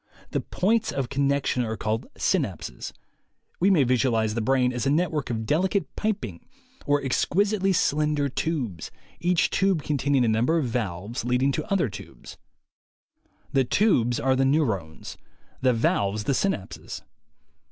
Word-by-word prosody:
The - - 0
points 220 +4 0
of 135 -4 -2
connection 140 -2 +1
are 110 -1 -3
called 110 +1 -2
"synapses." - - -2 0.7
We 190 - +4
may 175 -8 +5
visualize 120 -3 +1
the 115 - -1
brain 125 +1 +2
as 120 0 -2
a - - +3
network 155 -2 0
of 110 -2 -2
delicate 185 - 0
piping 195 - -3 0.4
or 145 -1 +2
exquisitely 195 - +1
slender 150 -4 +1
tubes, 130 - -3 0.3
each 175 0 +2
tube 190 -6 +1
con 145 -2 -1
taining 135 -2 +2
a - - +1
number 115 +9 +2
of 155 - 0
valves 110 -2 -3
leading 125 +3 +2
to 205 - -4
other 190 -8 +2
tubes. 100 - -11 1.2
The 135 - +4
tubes 125 - +2
are 130 0 +2
the 135 - +2
neurones; 110 - -1 0.4
the 130 - +4
valves 105 -3 0
the 135 - 0
synapses. 165 - -3
135 Hz, 145 wpm, -25 LUFS, 115-160 Hz, 1.2 s, may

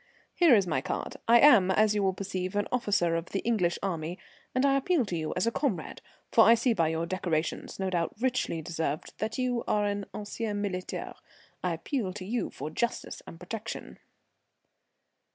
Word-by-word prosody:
"Here 335 -8 +6
is 200 -3 +3
my 155 -7 0
card. - - -4
I 235 +1 +7
am, 235 -11 +7
as 210 +2 +4
you 210 - +1
will 190 -1 +1
perceive, 190 -1 -4
an 205 0 +1
officer 205 -8 +1
of 165 +1 -2
the 195 - -2
English 185 -7 +1
army, 170 -2 -2 0.4
and 255 +2 +3
I 275 -1 +4
appeal 275 0 +2
to 180 - -3
you 155 -2 -2
as 180 - +1
a 230 - +2
comrade, 220 - -2 0.3
for 225 - +7
I 230 +1 +7
see 235 +1 +2
by 165 -7 +2
your 160 +1 -1
decorations, 170 -3 -2
no 190 -1 -2
doubt 170 -2 -1
richly 245 -10 0
deserved, 160 -2 -3
that 220 +1 -2
you 250 -2 0
are 210 0 +2
an 205 -1 -2
ancien 210 0 -4
militaire. 185 -3 -4 0.5
I - - 0
appeal 230 -11 -3
to 185 -1 -7
you 235 +4 -1
for 155 - -6
justice 235 +8 -2
and 165 - -10
protection." 220 +5 -6
200 Hz, 190 wpm, -29 LUFS, 175-230 Hz, 0.5 s, I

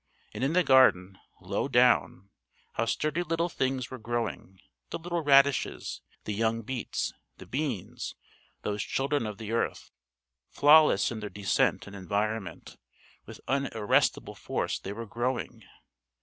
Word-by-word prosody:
And - - -4
in 140 +4 +1
the 180 +1 +4
garden, 95 - +4 0.2
low - - -2
down, 100 +2 +2 0.4
how 115 - 0
sturdy 155 +7 -1
little 170 0 -1
things 130 -5 -2
were 130 - -7
growing: 115 -4 -4 0.3
the - - -3
little 170 0 -3
radishes, 140 -2 +3 0.2
the 105 - -3
young 115 +2 0
beets, 125 +1 -3 0.2
the - - -11
beans 130 - -4 0.5
those 105 0 -2
children 135 -3 -1
of 105 -2 -6
the 110 0 -6
earth, 115 - -2 0.6
flawless 150 -1 +5
in 115 - -5
their 105 -1 -5
descent 100 -4 0
and 100 - -10
environment 100 +1 -3 0.5
with - - -11
what 135 +1 +1
unarrestable 110 -6 +1
force - - -2
they 95 - -6
were 115 +3 -6
growing! 120 -1 -3
120 Hz, 140 wpm, -28 LUFS, 105-140 Hz, 0.6 s, flawless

